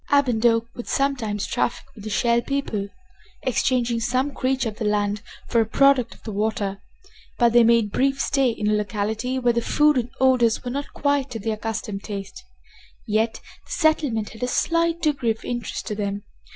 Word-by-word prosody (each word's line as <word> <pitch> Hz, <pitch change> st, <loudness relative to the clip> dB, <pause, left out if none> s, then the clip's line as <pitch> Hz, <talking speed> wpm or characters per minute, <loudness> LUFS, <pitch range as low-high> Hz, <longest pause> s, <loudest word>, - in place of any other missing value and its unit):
Ab 285 Hz, -1 st, +4 dB
and 225 Hz, -2 st, 0 dB
Oak 230 Hz, 0 st, +2 dB
would 240 Hz, -, -7 dB
sometimes 245 Hz, -7 st, 0 dB
traffic -, -, -1 dB
with 210 Hz, -, -12 dB
the 215 Hz, -, -5 dB
Shell 235 Hz, +2 st, +2 dB
People, 240 Hz, -7 st, -2 dB, 0.6 s
exchanging 245 Hz, -2 st, +1 dB
some 255 Hz, +5 st, 0 dB
creature 260 Hz, -2 st, 0 dB
of 215 Hz, -, -11 dB
the 220 Hz, -, -3 dB
land 205 Hz, 0 st, 0 dB, 0.3 s
for 235 Hz, -, +3 dB
a -, -, +1 dB
product 275 Hz, 0 st, +3 dB
of -, -, -23 dB
the 220 Hz, -, -5 dB
water, 205 Hz, -1 st, -1 dB, 0.6 s
but 235 Hz, -2 st, +4 dB
they 240 Hz, 0 st, +7 dB
made 230 Hz, -2 st, +3 dB
brief 275 Hz, +3 st, +1 dB
stay 275 Hz, -2 st, +2 dB
in 220 Hz, -2 st, -2 dB
a 215 Hz, -, +3 dB
locality 215 Hz, +4 st, -1 dB
where 245 Hz, -2 st, +2 dB
the 235 Hz, -, +1 dB
food 295 Hz, +3 st, +3 dB
and 240 Hz, 0 st, -3 dB
odors 255 Hz, -4 st, +3 dB
were 245 Hz, -, -4 dB
not 280 Hz, +2 st, -4 dB
quite 285 Hz, -1 st, +1 dB
to 230 Hz, -, -5 dB
their 220 Hz, +1 st, -2 dB
accustomed 215 Hz, -2 st, -4 dB
taste. 200 Hz, -, -7 dB, 0.6 s
Yet 220 Hz, +1 st, 0 dB, 0.3 s
the -, -, -13 dB
settlement 295 Hz, -9 st, +1 dB
had 220 Hz, -, -13 dB
a 250 Hz, -, 0 dB
slight 335 Hz, +5 st, +1 dB
degree 280 Hz, -6 st, +1 dB
of 225 Hz, 0 st, -2 dB
interest 240 Hz, -1 st, -4 dB
to 215 Hz, -, -3 dB
them. 200 Hz, -1 st, -3 dB
235 Hz, 190 wpm, -23 LUFS, 215-265 Hz, 0.6 s, they